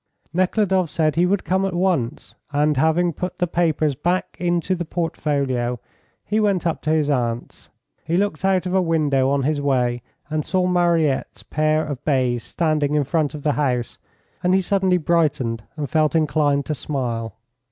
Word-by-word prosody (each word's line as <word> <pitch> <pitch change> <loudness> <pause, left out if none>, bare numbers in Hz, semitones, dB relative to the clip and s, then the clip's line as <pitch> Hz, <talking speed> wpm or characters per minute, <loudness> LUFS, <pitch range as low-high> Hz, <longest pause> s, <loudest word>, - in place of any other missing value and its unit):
Nekhludoff 185 -1 +1
said 155 -2 0
he 175 +2 +3
would 200 +1 +1
come 190 +1 +1
at 190 -2 -1
once, 170 -8 -1 0.2
and 150 +1 +2
having 160 +5 +2
put 180 +4 -5
the 180 - +1
papers 160 -3 +1
back 175 +7 -1
into 175 +1 0
the 175 -1 -2
portfolio, 140 -7 -1 0.5
he 215 +1 0
went 200 -5 +1
up 165 - -1
to 155 - -3
his 155 -2 +2
aunt's. 120 -4 -2 0.3
He 165 +2 0
looked 200 -4 -1
out 190 -1 +2
of 180 - -2
a 190 - +3
window 150 -6 +2
on 140 -1 +1
his 145 +1 0
way, 125 -3 +1 0.3
and 155 +1 -2
saw 185 +3 0
Mariette's 170 -6 +1
pair 155 +1 +1
of 145 -2 -6
bays 130 -5 +1
standing 150 0 0
in 150 - +3
front 150 +1 -1
of 145 - -8
the 150 - +2
house, 125 -5 -1 0.4
and 180 +1 +3
he 190 - +3
suddenly 190 -1 +2
brightened 150 -9 0
and 145 -2 -2
felt 155 +2 +1
inclined 145 -2 +2
to 155 - -2
smile. 120 -6 -3
155 Hz, 175 wpm, -22 LUFS, 140-175 Hz, 0.5 s, he